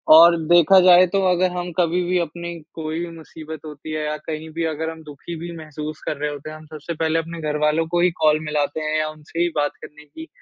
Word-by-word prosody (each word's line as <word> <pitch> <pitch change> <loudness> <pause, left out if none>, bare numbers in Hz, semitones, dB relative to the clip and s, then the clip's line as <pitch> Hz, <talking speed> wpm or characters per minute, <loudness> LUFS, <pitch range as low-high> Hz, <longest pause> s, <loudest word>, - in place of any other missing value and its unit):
और 170 +1 +8
देखा 175 +2 +7
जाए, 180 0 +7
तो 195 +2 0
अगर 180 0 +2
हम 175 0 -3
कभी 175 +1 +2
भी 180 0 +2
अपनी 170 +1 -4 0.2
कोई 160 0 -4
भी 175 - -3
मुसीबत 160 0 -9
होती 150 +1 -8
है 155 -1 -2
या 150 0 -2
कहीं 160 0 -5
भी 165 - -2
अगर 160 +2 -3
हम 160 -1 -9
दुखी 150 +3 -8
भी 170 +1 -6
महसूस 155 -1 -7
कर 150 - -2
रहे 150 +1 -2
होते 145 +1 -8
हैं, 155 - -8
हम 155 - -14
सबसे 155 +2 -5
पहले 160 0 0
अपने 165 0 -6
घरवालों 150 +2 +1
को 175 +1 +1
ही 180 - +4
कॉल 155 0 +4
मिलाते 150 0 -1
हैं 155 0 -1
या 155 - 0
उनसे 155 +2 -9
ही 175 - +2
बात 145 -1 +1
करने 150 0 -12
की 320 - -11
160 Hz, 240 wpm, -22 LUFS, 155-170 Hz, 0.2 s, और